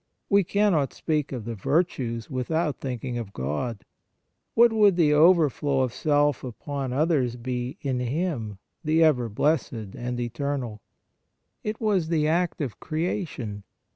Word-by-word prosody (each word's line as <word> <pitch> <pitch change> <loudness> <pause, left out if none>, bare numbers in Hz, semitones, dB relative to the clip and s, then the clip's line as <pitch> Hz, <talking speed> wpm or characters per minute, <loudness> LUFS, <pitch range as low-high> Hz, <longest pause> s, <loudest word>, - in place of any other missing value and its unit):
We 200 0 +5
cannot 185 -7 +2
speak 150 -3 -1
of 125 -5 -5
the 115 - -3
virtues 115 - -1
without 145 +4 -1
thinking 125 -2 -4
of 105 -4 -7
God. 75 - -3 0.7
What 235 0 +6
would 205 -4 +5
the 155 -4 +4
over 165 +1 +6
flow 140 0 0
of 125 -2 0
self 145 -2 +2
upon 135 +2 -4
others 135 -4 +1
be 125 +1 -4
in 130 -3 -1
Him, 125 - -2 0.3
the 160 +1 +3
Ever 125 -7 +3
blessed 150 +10 +1 0.2
and 120 0 -4
Eternal? 120 -2 -3 0.8
It 215 0 -3
was 200 -7 +1
the 155 -2 +1
act 170 +1 0
of 130 -7 -4
creation. 155 - -3
140 Hz, 140 wpm, -26 LUFS, 120-165 Hz, 0.8 s, What